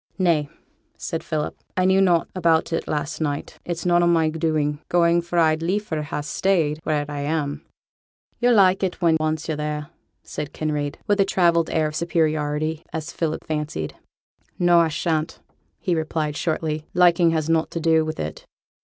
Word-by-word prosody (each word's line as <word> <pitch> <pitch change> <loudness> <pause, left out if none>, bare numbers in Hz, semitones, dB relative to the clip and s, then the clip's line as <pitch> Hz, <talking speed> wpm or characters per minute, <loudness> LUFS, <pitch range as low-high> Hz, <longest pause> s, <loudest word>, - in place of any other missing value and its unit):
'Nay,' 165 -6 +2 0.5
said 165 -2 -4
Philip, 155 -2 -3 0.2
'I 185 - +3
knew 190 +1 +4
nought 175 -3 +3
about 165 -2 +2
it 165 - -2
last 150 +1 -3
night; 145 -2 -3
it's 170 -1 -4
none 175 0 +4
o' 175 - +3
my 165 -2 +3
doing, 155 -2 0
going, 170 0 +3
for 175 +1 -4
I'd 160 -1 +3
liefer 180 -2 -1
ha' 150 0 -4
stayed 160 -2 +1
where 150 -2 -1
I 145 -1 -5
am.' 145 0 -2 0.8
'Yo'll 245 0 +4
like 190 -2 +5
it 190 -2 -2
when 170 -3 +3
once 155 0 -1
yo're 155 -2 -2
there,' 150 0 -3 0.3
said 150 -1 -6
Kinraid, 150 -2 -2
with 205 -1 +1
a - - +7
travelled 170 -3 +2
air 160 -1 +1
of 150 - -6
superiority, 155 -2 0
as 160 +1 -5
Philip 160 -2 -2
fancied. 150 - -3 0.6
'No, 175 -1 +5
I 165 - +4
shan't,' 160 0 -2 0.4
he 185 - -1
replied, 155 -2 -1
shortly. 155 -1 -2
'Liking 175 -1 +5
has 160 -2 0
nought 165 -1 +1
to 170 - -4
do 160 -1 +3
with 155 0 -5
it.' 75 +1 -5
160 Hz, 175 wpm, -23 LUFS, 150-170 Hz, 0.8 s, a